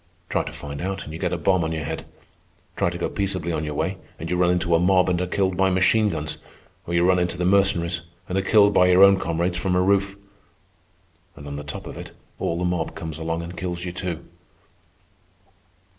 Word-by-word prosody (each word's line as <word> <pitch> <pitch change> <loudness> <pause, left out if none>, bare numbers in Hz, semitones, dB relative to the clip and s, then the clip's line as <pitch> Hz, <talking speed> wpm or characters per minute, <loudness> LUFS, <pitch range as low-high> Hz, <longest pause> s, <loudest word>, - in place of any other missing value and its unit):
Try - - +1
to - - -6
find 70 0 -7
out, 95 +2 -3
and 75 - -9
you 80 - -6
get - - -1
a 90 - -1
bomb 90 +1 +2
on 80 0 -2
your 80 -1 -3
head. 80 +3 -5 0.7
Try - - +1
to 85 - -5
go 85 - -1
peaceably 95 -4 -2
on 80 -2 -2
your 75 -1 -4
way, - - -2 0.2
and 80 +2 -6
you - - +2
run 90 0 +3
into 90 -1 +1
a 85 - +5
mob 90 +1 +3
and 90 0 0
are 90 - -1
killed 95 0 0
by 95 +1 +3
machine 100 +4 +3
guns, 75 -3 -3 0.5
or 85 - -2
you 85 +1 +3
run 90 -1 +4
into 90 0 -1
the 90 - -1
Mercenaries 90 -3 +2 0.3
and 90 - -3
are 95 - +2
killed 100 +1 +5
by 90 - +5
your 90 +1 +6
own 100 -1 +7
comrades 85 +1 -1
from 90 0 0
a 90 - +3
roof. 100 0 +2 1.2
And 70 - -11
on 70 0 -6
the 75 - -6
top 70 - -7
of - - -8
it - - -9 0.3
all 85 - -1
the 90 - -1
mob 90 -2 -2
comes 80 -2 -6
along 80 +1 -2
and 85 +1 -8
kills 90 0 -4
you, 90 - -3
too." 85 -2 -5
90 Hz, 235 wpm, -23 LUFS, 85-95 Hz, 1.2 s, own